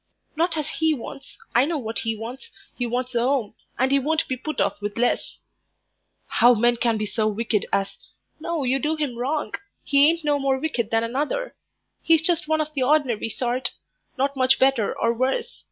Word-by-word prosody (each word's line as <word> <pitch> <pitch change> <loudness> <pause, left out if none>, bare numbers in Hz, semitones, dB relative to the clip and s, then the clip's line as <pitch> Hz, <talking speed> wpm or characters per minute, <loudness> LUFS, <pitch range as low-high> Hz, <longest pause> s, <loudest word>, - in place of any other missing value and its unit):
"Not 330 +1 +1
as 300 - -2
he 320 -1 +1
wants. 275 +2 -10 0.2
I 240 - +5
know 325 +1 -1
what 225 -4 -3
he 225 0 -1
wants; 245 - -8 0.3
he 245 - -2
wants 250 +2 -2
a 235 - +2
'ome, 245 -3 0 0.2
and 260 +1 +2
he 275 - +4
won't 315 +4 0
be 260 - -1
put 310 +5 -5
off - - 0
with 205 +1 -4
less." 245 +1 0 0.9
"How 245 +1 +5
men 240 +2 +3
can 230 -2 +1
be 215 - -2
so 215 +1 -1
wicked 215 0 -1
as 195 0 -1 0.2
" - - -47
"No, 330 -2 -2
you 260 +1 +1
do 305 +4 0
him 295 -6 -2
wrong. 275 +6 -2 0.3
He 285 +1 +5
ain't 335 0 -1
no 290 -1 +2
more 270 -1 +1
wicked 260 -6 -2
than 225 0 +1
another; 290 - -2 0.5
he's 325 -1 +4
just 335 -2 +2
one 315 0 +2
of 305 0 -4
the 275 - -2
ordinary 255 -5 +2
sort 250 +3 -2 0.4
not 275 +2 0
much 260 0 +4
better 265 -5 +3
or 230 0 +2
worse. 265 - -1
265 Hz, 200 wpm, -24 LUFS, 235-305 Hz, 0.9 s, I